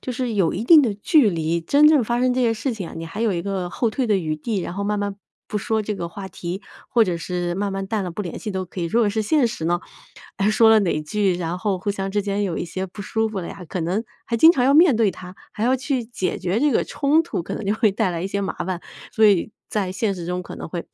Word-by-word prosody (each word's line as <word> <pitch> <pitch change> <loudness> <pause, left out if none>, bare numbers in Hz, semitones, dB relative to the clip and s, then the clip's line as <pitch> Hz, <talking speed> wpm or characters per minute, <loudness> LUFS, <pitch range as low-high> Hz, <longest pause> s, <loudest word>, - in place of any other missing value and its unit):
就 255 - -4
是 245 -1 -2
有 190 -6 +1
一 210 +6 -3
定 315 +3 +8
的 225 -7 0
距 250 - +4
离。 165 -1 -1
真 285 - +4
正 300 -5 +5
发 240 +2 -1
生 255 0 +3
这 255 - 0
些 230 -2 +2
事 250 +3 -2
情 195 -6 -6
啊， - - -10
你 165 - -5
还 200 +7 -7
有 225 -4 +2
一 170 -1 -2
个 190 -2 -3
后 225 +4 -1
退 255 +2 -1
的 210 -2 +3
余 155 -4 -1
地， 195 +6 -3
然 175 - -5
后 200 +2 -3
慢 205 0 -1
慢 200 -1 -2 0.3
不 210 - -2
说 220 +1 -1
这 210 0 -3
个 170 -3 -4
话 190 +3 -8
题 180 +2 -6 0.3
或 230 -2 +4
者 175 -3 -2
是 175 0 -3
慢 200 +1 -1
慢 195 0 -3
淡 210 0 -1
了 180 - -4
不 205 +5 -4
联 175 - -6
系 215 - -5
都 190 -1 -3
可 180 0 -8
以。 - - -1
如 225 +8 +1
果 210 -3 +3
是 220 +1 -1
现 255 +4 +2
实 165 -8 -4
呢， 175 +1 +1 0.6
哎 200 +1 +2
说 220 +1 +5
了 220 -1 +6
哪 170 -5 0
句， 195 +4 0
然 175 0 -3
后 190 -1 -1
互 205 +3 -2
相 195 -1 -3
之 205 0 0
间 200 0 -1
有 175 -4 -2
一 - - -2
些 185 +3 -4
不 200 +2 -9
舒 220 +3 -1
服 205 -3 -4
了 170 - -6
呀， 185 - -9
可 180 - -3
能 185 +7 -1 0.2
还 230 -1 -2
经 320 - +9
常 260 -7 +2
要 275 - +4
面 305 -5 +6
对 220 -4 +3
它， 180 0 -10 0.2
还 215 - -2
要 255 +2 +3
去 260 -1 -1
解 220 -5 -3
决 185 +4 -1
这 295 +2 +3
个 - - +2
冲 300 +3 +2
突 255 - -4
可 - - -5
能 - - -5
就 205 - +2
会 215 -2 +2
带 200 0 +1
来 170 0 -3
一 - - -1
些 200 +1 -2
麻 195 - -3
烦。 180 -1 -3 0.3
所 220 0 +5
以 200 0 +3 0.2
在 195 -4 -1
现 200 +1 0
实 170 - -6
中 180 0 -2
可 - - -9
能 - - -7
会 170 +1 -5
200 Hz, 320 characters per minute, -22 LUFS, 180-225 Hz, 0.6 s, 经